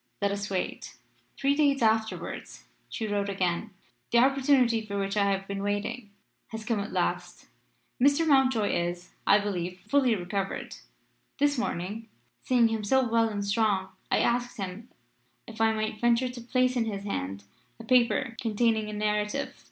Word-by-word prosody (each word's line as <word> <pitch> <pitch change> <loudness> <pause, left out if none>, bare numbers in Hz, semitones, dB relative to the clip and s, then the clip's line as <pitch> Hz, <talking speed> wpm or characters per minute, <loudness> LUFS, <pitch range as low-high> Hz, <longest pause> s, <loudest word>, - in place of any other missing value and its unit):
Let 200 -1 +1
us 200 +1 -3
wait." 190 -2 -4 0.4
Three 275 +1 +2
days 285 -3 +2
afterwards 220 0 -1 0.3
she 225 - -4
wrote 205 -1 -1
again. 185 +1 -1 0.4
"The 235 - +4
opportunity 260 -3 +4
for 200 -2 -5
which 195 0 -2
I 200 -1 +3
have 195 0 -1
been 200 0 -4
waiting 205 +3 -3 0.4
has 220 -1 -7
come 225 -2 0
at 200 +1 -4
last. - - -2 0.5
Mr. 285 +5 +4
Mountjoy 260 -7 +3
is, 175 +1 -2 0.2
I 205 - +7
believe, 185 -3 -3
fully 265 -5 +2
recovered. 195 +1 -4 0.6
This 285 0 +2
morning, 215 +1 -4 0.3
seeing 240 -3 +3
him 220 -1 -2
so 260 +4 +3
well 230 0 +2
and 205 -2 -3
strong, 200 -2 +1 0.2
I - - +2
asked 245 +1 0
him 195 +4 -6 0.6
if 225 0 -7
I 225 0 +4
might 215 -1 -3
venture 240 +1 +3
to 245 -1 -8
place 255 +1 +1
in 235 -2 +1
his 200 -3 -4
hands 100 - -4 0.3
a - - -8
paper 245 -1 +2
containing 220 -1 +1
a - - -6
narrative. 210 +5 -1
220 Hz, 160 wpm, -28 LUFS, 200-245 Hz, 0.6 s, I